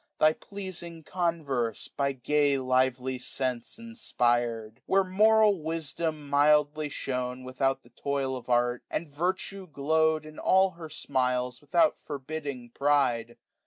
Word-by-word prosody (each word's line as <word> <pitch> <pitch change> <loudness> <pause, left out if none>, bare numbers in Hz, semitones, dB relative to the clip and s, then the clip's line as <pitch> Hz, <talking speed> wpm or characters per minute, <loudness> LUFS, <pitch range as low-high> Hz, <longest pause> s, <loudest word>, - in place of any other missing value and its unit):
Thy 155 0 +5
pleasing 175 -5 -7
converse, 150 - -1
by 140 -1 -1
gay 145 +2 +2
lively 130 0 +1
sense 125 -2 -3
Inspired: 120 - -1
where 195 0 +4
moral 210 0 +4
wisdom 160 -1 -3
mildly 150 +1 +3
shone. 125 -2 -3
Without 135 +1 -1
the 120 - -21
toil 135 +1 -2
of 125 -1 -8
art; 120 0 +2
and 170 - -3
virtue 185 +5 -2
glow'd. 155 +1 +1
In 155 0 -10
all 190 0 +4
her 165 -3 -10
smiles, 125 -4 -1
without 150 +4 +2
forbidding 140 -4 -6
pride. 130 -5 +1
145 Hz, 125 wpm, -28 LUFS, 125-160 Hz, -, Thy